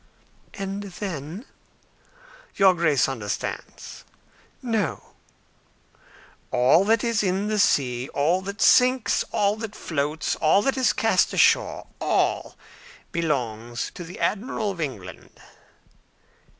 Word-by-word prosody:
"And 195 0 -4
then?" 185 - -6 1.1
"Your 195 -2 +5
Grace 155 -6 +2
understands." 110 -7 -6 0.6
"No." 225 -4 -2 1.4
"All 130 +9 +4
that 225 +1 +2
is 230 -2 +1
in 195 +1 -1
the 215 -1 0
sea, 125 -8 +1
all 165 +6 +1
that 200 +2 -3
sinks, 255 -1 +4
all 205 0 +1
that 220 -2 -6
floats, 150 0 -2
all 165 +6 +3
that 270 - +1
is 260 -1 +3
cast - - +2
ashore - - +3
all - - 0 0.6
belongs 120 - -2
to 175 - -8
the 175 +2 -10
Admiral 215 0 -1
of 175 -3 -7
England." 100 - -7
185 Hz, 110 wpm, -24 LUFS, 140-210 Hz, 1.4 s, Your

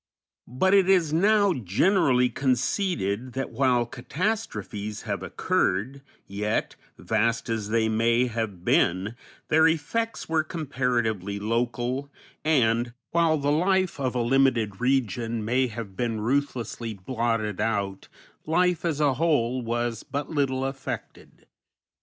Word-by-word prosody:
But 190 +11 +1
it 195 -2 +5
is 175 -6 +3
now 200 +3 +4
generally 125 - +2
conceded 125 - -1
that 135 +1 -3
while 125 -3 +2
catastrophes 120 - -4
have - - -3
occurred, 120 +10 -1 0.2
yet, 105 +2 -2 0.2
vast 115 +1 0
as 110 -2 -2
they 110 0 +2
may 115 +2 +2
have 110 -7 -4
been, 95 +5 +2 0.4
their 160 +1 +5
effects 195 +9 -1
were 160 -1 +1
comparatively 120 - -1
local, 120 +5 -1 0.3
and, 120 -6 +2 0.2
while 165 -2 +3
the 145 0 0
life 185 +2 +1
of 130 -2 -1
a 120 - +1
limited 120 -5 +2
region 115 -3 0
may 125 +3 +2
have 110 -4 -7
been 115 0 -1
ruthlessly 120 -2 -2
blotted 115 -1 -2
out, 100 -3 -2 0.4
life 180 +1 +2
as 160 -4 -1
a 145 -3 +3
whole 130 -4 +1
was 120 -1 -2
but 145 +2 -5
little 135 -3 0
affected. 135 0 -7
125 Hz, 125 wpm, -26 LUFS, 110-150 Hz, 0.4 s, it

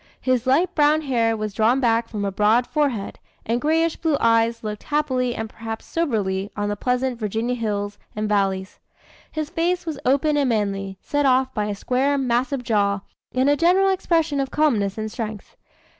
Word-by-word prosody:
His 255 -1 0
light 305 +8 +3
brown 300 +1 +3
hair 230 -6 +1
was 215 -1 -4
drawn 225 +6 +3
back 230 -2 +1
from 205 -2 -3
a 200 - -1
broad 215 +5 +3
forehead, 275 -10 -1 0.3
and 235 +2 0
grayish 325 +2 +1
blue 315 -4 +1
eyes 230 0 +2
looked 210 -1 -4
happily 260 -5 0
and 220 - -3
perhaps 225 0 -7
soberly 205 - -1
on 205 0 -1
the 205 - -1
pleasant 250 +2 -1
Virginia 225 +3 -1
hills 205 -3 -3 0.2
and 215 0 -1
valleys. 195 -2 -1 0.5
His 310 -1 -4
face 350 +1 0
was 315 -4 -4
open 285 +3 +2
and 280 -3 +2
manly, 195 -3 -1
set 290 -1 +1
off 260 0 +2
by 210 -2 -1
a 210 -1 -3
square, 265 +7 0
massive 255 +1 0
jaw, 200 -4 +1 0.3
and 260 +2 +3
a 290 - +4
general 360 +5 +4
expression 330 -6 +1
of 270 -1 -1
calmness 225 -11 +1
and 215 0 -4
strength. 215 -3 -6
240 Hz, 180 wpm, -22 LUFS, 210-285 Hz, 0.5 s, a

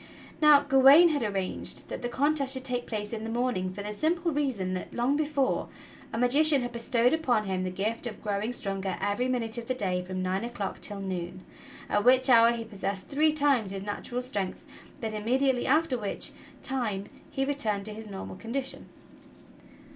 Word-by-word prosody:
Now 300 -2 +7
Gawain 280 +4 +7
had 295 -3 0
arranged 195 -4 -3
that - - -5
the 245 - -3
contest 275 +1 +1
should 260 - -5
take 245 -2 -1
place 210 -1 -3
in 220 -1 -4
the 225 - -4
morning 230 -6 -1
for 200 +2 -7
the 210 +1 -4
simple 335 +7 0
reason 260 -11 -1
that, 185 - -5
long 245 +4 +1
before, 290 -3 0 0.4
a - - -4
magician 275 +3 +4
had 245 - -4
bestowed 235 +2 +1
upon 260 -9 +1
him 190 -2 -2
the 185 - -2
gift 215 +6 -3
of 220 - -8
growing 210 +2 -1
stronger 195 -5 -1
every 205 +5 0
minute 235 -2 -1
of 230 - -9
the 255 - -1
day 185 -6 0
from 185 0 -4
nine 185 +3 -1
o'clock 235 -5 -5
till 205 -2 -3
noon, 185 -1 -5 0.4
at 205 - +1
which 255 +2 +5
hour 230 -1 +7
he 235 -1 -3
possessed 200 -3 -5
three 305 +2 +3
times 285 -8 +2
his 195 0 -4
natural 240 +4 -4
strength, 200 -7 -4 0.3
but 225 -2 -3
imme 220 +5 0
diately 265 -3 +1
after 290 -2 +2
which 205 -2 -1 0.3
time 225 -8 -1 0.2
he 270 - -1
returned 220 -8 -1
to 215 - -4
his 220 +1 -9
normal 195 -2 -7
condition. 265 +5 -4
235 Hz, 190 wpm, -28 LUFS, 200-270 Hz, 0.4 s, Now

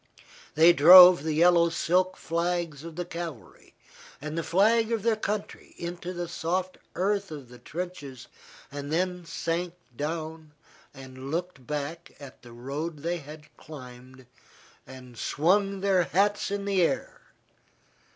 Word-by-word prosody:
They 165 +3 +7
drove 180 +3 +9
the 155 0 -2
yellow 170 +1 +5
silk 180 +3 0
flags 170 -3 -2
of 165 -1 -9
the 175 +1 -4
cavalry 165 -7 -9 0.4
and 150 +2 -6
the 165 - -1
flag 220 +7 +2
of 225 -3 -1
their 230 -1 +2
country 210 -1 -5
into 175 +1 -6
the 175 -1 -5
soft 180 +2 -3 0.2
earth 200 +2 -1
of 145 -6 -9
the 125 0 -14
trenches, 145 -3 -7 0.5
and 145 +1 -6
then 180 +1 -1
sank 170 +1 -3 0.2
down 155 +1 -5 0.4
and 130 -1 -10
looked 165 -5 -5
back 150 +3 -5
at 140 -3 -12
the 120 - -14
road 140 +6 -6
they 175 +1 -1
had 150 +1 -13
climbed 130 -3 -12 0.6
and 125 -3 -12
swung 195 +5 +1
their 190 -3 +2
hats 205 +4 +1
in 200 0 -3
the 195 -2 +1
air. 270 - -1
170 Hz, 140 wpm, -27 LUFS, 145-180 Hz, 0.6 s, drove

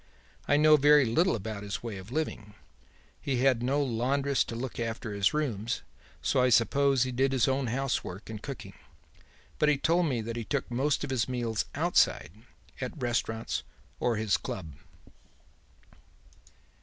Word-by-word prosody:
I 145 - +4
know 155 0 +6
very 145 0 +6
little 160 +10 +2
about 105 -1 -5
his 100 +2 -5
way 115 -4 -5
of 95 +5 -11
living. 110 -8 -3 0.7
He 135 -3 -1
had 130 -3 +3
no 140 +4 +1
laundress 135 +3 +1
to 115 - -6
look 120 +1 -5
after 115 -2 -3
his 100 -1 +2
rooms, 125 -7 -2 0.4
so - - +2
I 125 - +4
suppose 135 +3 +3
he 130 - -2
did 135 +2 +1
his 130 -4 +2
own 135 -1 0
house 135 +3 -1
work 95 +4 -8
and 110 -2 -7
cooking; 135 0 -7 0.9
but 150 - +4
he 150 - +3
told 170 +4 +2
me 125 -5 -1
that 115 +1 -5
he 115 - -3
took 140 +2 -3
most 135 +5 0
of - - -4
his 125 -1 0
meals 120 -3 -1
outside, - - +2 0.5
at 130 +4 -5
restaurants 115 -2 -1 0.4
or 120 -2 +1
his 110 -1 +1
club. 80 -6 -6
125 Hz, 165 wpm, -29 LUFS, 110-140 Hz, 0.9 s, know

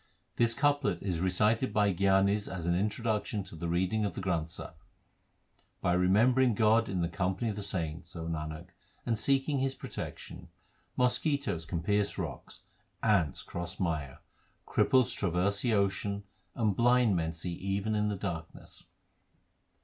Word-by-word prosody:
This 115 -1 +3
couplet 145 - +1
is 90 -4 -1
recited 105 +7 +2
by 105 -2 +2
gyanis 100 +2 +2
as 90 -3 -5
an 85 - +2
introduction 105 +2 -1
to 90 -2 -11
the 85 +2 -4
reading 95 +6 +1
of 100 -5 -2
the - - -4
Granth 85 -4 -1
Sahib: 85 - -8 1.1
By 90 - +1
remembering 110 +7 +4
God 110 +1 +3
in 95 -2 -1
the - - +1
company 95 +6 -1
of - - -6
the 105 - -5
saints, 85 -3 -4
Nanak, 80 0 -5 0.4
and 115 - +1
seeking 140 +2 +1
His 135 0 0
protection, 130 -4 -7 0.5
Mosquitoes 125 - +1
can 85 0 -3
pierce 100 +1 +1
rocks, - - -6 0.4
ants 95 - +2
cross 85 0 -6
mire, 75 -7 -2 0.4
Cripples 130 -2 +3
traverse 95 +2 0
the 115 -3 +2
ocean, 100 0 0 0.3
and 110 -5 +1
blind 120 -2 +4
men 80 -1 0
see 85 +2 -5
even 100 +4 -2
in 105 0 +1
the 105 - -2
darkness. 85 -4 -7
100 Hz, 150 wpm, -31 LUFS, 85-110 Hz, 1.1 s, remembering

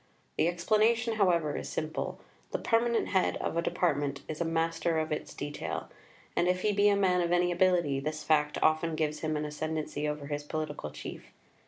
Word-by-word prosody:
The - - +3
explanation, 220 +6 +2
however, 170 -7 +2
is - - -4
simple. 155 0 -3 0.3
The - - -1
permanent 230 0 +1
head 190 -2 +2
of - - -3
a 170 - +2
Department 145 -5 0
is 155 +1 -5
a - - +1
master 165 0 0
of 155 0 -1
its 150 - -4
detail, 145 0 -4 0.5
and 175 - +2
if 180 0 +1
he 215 - +3
be 205 +1 +5
a 200 - +4
man 185 -2 +3
of 170 0 0
any 175 0 +3
ability, 175 -6 +2
this 155 +2 -4
fact 150 -1 +2
often 155 +1 +2
gives 155 -1 -1
him 155 -1 -1
an 150 - -2
ascendancy 150 0 -3
over 150 -1 -3
his 145 0 -3
political 150 - -4
chief. - - -8
160 Hz, 190 wpm, -30 LUFS, 150-180 Hz, 0.5 s, be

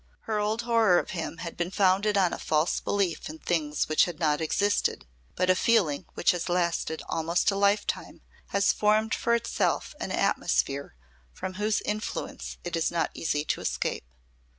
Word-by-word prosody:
Her 215 -1 -2
old 215 +3 -1
horror 230 -6 +4
of - - -1
him 165 -2 -4
had 170 - -6
been 175 0 -2
founded 195 +2 +2
on 185 -3 +3
a - - -5
false 155 +2 +1
belief 195 -6 -1
in 155 - -8
things 155 -3 -1
which 155 - +4
had 175 -3 -7
not 150 -1 +1
existed, 200 +6 0 0.3
but 185 - +1
a 185 - +6
feeling 185 -9 +2
which - - +3
has 180 0 -3
lasted 170 -2 0
almost 165 +4 +1
a - - -2
lifetime 200 +1 0 0.3
has 200 0 +2
formed 215 +1 +2
for 235 0 +2
itself 235 0 -1
an - - -4
atmosphere 140 - 0 0.4
from 185 - -6
whose 210 +2 0
influence 210 +1 -4
it 175 -1 -3
is 165 -1 +1
not 170 -1 -1
easy 150 -2 -1
to - - -1
escape. - - -2
180 Hz, 175 wpm, -27 LUFS, 165-210 Hz, 0.4 s, a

